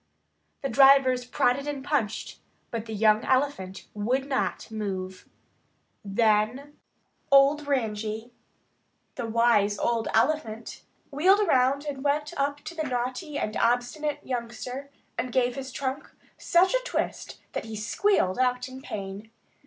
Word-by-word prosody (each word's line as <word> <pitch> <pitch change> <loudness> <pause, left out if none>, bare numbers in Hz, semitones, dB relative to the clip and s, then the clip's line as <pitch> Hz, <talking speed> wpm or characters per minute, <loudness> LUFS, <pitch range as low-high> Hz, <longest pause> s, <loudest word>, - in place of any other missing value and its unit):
The - - +1
drivers 265 0 +5
prodded 250 +3 +1
and 280 -2 -4
punched, 225 -8 -2 0.3
but 230 -1 -4
the 220 - -5
young 215 +1 +4
elephant 255 -9 0
would 250 +6 -1
not 265 -4 -2
move. 190 -4 -5 0.7
Then 220 +7 +1 0.6
old 280 +2 +5
Ranji, 220 -3 -2 0.8
the 240 -3 -4
wise 220 -3 +3
old 230 +1 0
elephant, 230 -3 0 0.3
wheeled 370 +9 +4
around 275 -5 +2
and 275 -2 -5
went 295 +1 0
up 285 +1 -1
to 315 +3 -7
the 320 - -4
naughty 255 +5 -3
and 215 - -2
obstinate 245 +5 0
youngster 250 +2 -5 0.3
and 250 - -2
gave 245 0 +2
his 270 -1 -6
trunk 265 +1 -4 0.3
such 365 +4 +3
a - - +2
twist - - -3
that - - -4
he 220 -1 -7
squealed 215 - +1
out 250 0 +1
in 260 0 -10
pain. 200 -1 -7
250 Hz, 130 wpm, -27 LUFS, 220-280 Hz, 0.8 s, drivers